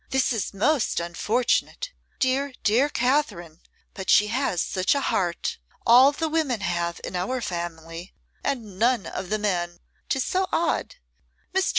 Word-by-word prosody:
'This 265 -1 +2
is 220 -4 -2
most 270 - +2
unfortunate. 235 - 0 0.3
Dear, 265 +1 +1
dear 245 +7 +3
Katherine, 245 - 0 0.3
but 190 -2 -6
she 210 0 +6
has 235 -6 0
such 185 +9 +1
a - - +2
heart! 175 -9 -1 0.3
All 250 +4 +8
the 320 +3 -2
women 305 -8 0
have 170 -2 -1
in - - -5
our 190 +9 -1
family, 170 -3 -5 0.3
and 225 -9 -3
none 235 -2 +3
of 185 - -5
the 215 - +1
men, 175 -4 -1 0.3
'tis 265 - +1
so 375 +5 0
odd. 340 - 0 0.6
Mr. 380 0 +2
225 Hz, 150 wpm, -25 LUFS, 180-270 Hz, 0.6 s, All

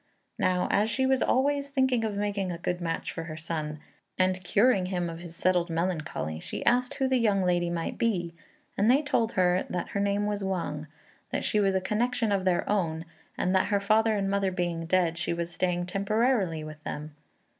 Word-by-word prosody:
Now, 180 -1 +2
as 210 +2 +2
she 265 +3 +1
was 265 -1 +2
always 280 +2 +1
thinking 260 -4 +2
of 215 -2 -2
making 200 -2 -1
a 170 - -4
good 175 +1 -3
match 165 -1 -2
for 165 - -5
her 155 -1 -7
son, 155 -2 -4 0.4
and 185 0 +1
curing 200 0 +3
him 175 -2 -2
of 165 - -8
his 170 -1 -8
settled 180 0 +1
melancholy, 165 - -2
she - - -6
asked 250 +1 +2
who 265 - +1
the 260 -1 +2
young 205 -4 +2
lady 175 -1 +1
might 170 -1 -3
be; 175 -7 0 0.4
and 205 +3 +3
they 275 +5 +5
told 235 -6 0
her 180 0 +3
that 180 - -3
her 200 - -2
name 200 +1 +1
was 205 -1 -2
Wang, 170 -5 -3 0.4
that - - -2
she 210 - +2
was 195 -2 +2
a 190 - +2
connection 230 +2 0
of 195 -2 +1
their 180 -2 +1
own, 165 -5 0 0.3
and 185 - +1
that 190 - +3
her 205 - +2
father 215 +2 +3
and 200 -1 0
mother 195 -1 +1
being 175 -2 -2
dead, 170 -2 +2
she 170 - -1
was 170 0 -4
staying 175 +1 0
temporarily 200 -3 +1
with 155 0 -9
them. 150 +1 -6
185 Hz, 205 wpm, -28 LUFS, 170-215 Hz, 0.4 s, they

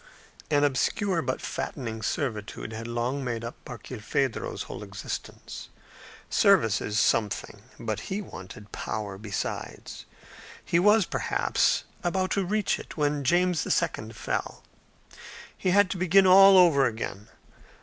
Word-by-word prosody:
An 145 -1 +3
obscure 165 - +1
but 130 -2 -3
fattening 115 -5 -4
servitude 110 -4 -3
had 115 +1 -6
long 120 +4 -2
made 120 -2 -3
up 115 - -8
Barkilphedro's 125 +1 -3
whole - - -8
existence. - - -7 0.6
Service 180 - +4
is 105 0 -1
something; 105 -2 0 0.2
but 110 -2 -3
he 195 - -2
wanted 105 - -10
power 100 -3 -5
besides. 105 -2 -5 0.6
He 170 - +2
was, 210 +2 +5
perhaps, - - +1 0.2
about 185 +2 0
to 200 - +1
reach 210 +2 0
it - - -10
when 145 -1 0
James 175 +3 +2
II. - - 0
fell. - - -4 0.9
He 185 - -1
had 200 0 +4
to - - -2
begin 190 +2 +5
all 195 +1 +8
over 155 -7 +6
again. 110 -3 -5
140 Hz, 130 wpm, -27 LUFS, 110-185 Hz, 0.9 s, all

